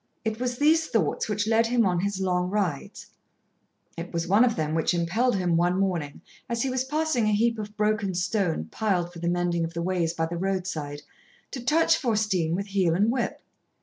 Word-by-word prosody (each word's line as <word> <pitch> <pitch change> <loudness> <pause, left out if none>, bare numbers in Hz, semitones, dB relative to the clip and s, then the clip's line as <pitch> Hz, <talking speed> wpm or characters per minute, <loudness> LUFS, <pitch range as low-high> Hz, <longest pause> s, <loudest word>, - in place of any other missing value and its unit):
It 220 0 -2
was 250 -1 -2
these 315 +3 +3
thoughts 225 -1 0
which 210 0 0
led 225 +1 +3
him 235 -1 +2
on 180 -2 +1
his 200 +1 -2
long 180 -1 0
rides; 190 -8 -2 0.9
it 170 +1 -7
was 170 0 -2
one 200 +6 +5
of 240 -3 +2
them 155 -1 -2
which 165 +2 +1
impelled 195 +9 +1
him, 180 -3 +1
one 175 +2 +2
morning, 170 -7 -2 0.3
as 235 -1 -1
he 265 - -1
was 255 0 0
passing 295 -4 0
a 215 - +2
heap 230 +2 +1
of 210 0 -7
broken 210 -3 0
stone, 180 - 0
piled 180 -5 -1
for 170 - -9
the 170 +1 -1
mending 175 -1 0
of 165 +1 -5
the 170 - -2
ways 175 -2 0
by 165 - 0
the 170 +1 -4
roadside, 170 -6 -3 0.5
to 255 - -6
touch 310 +6 +3
Faustine 210 - 0
with 200 +2 -3
heel 190 -4 +1
and 210 +5 +2
whip. 245 -1 -2
195 Hz, 205 wpm, -26 LUFS, 170-225 Hz, 0.9 s, one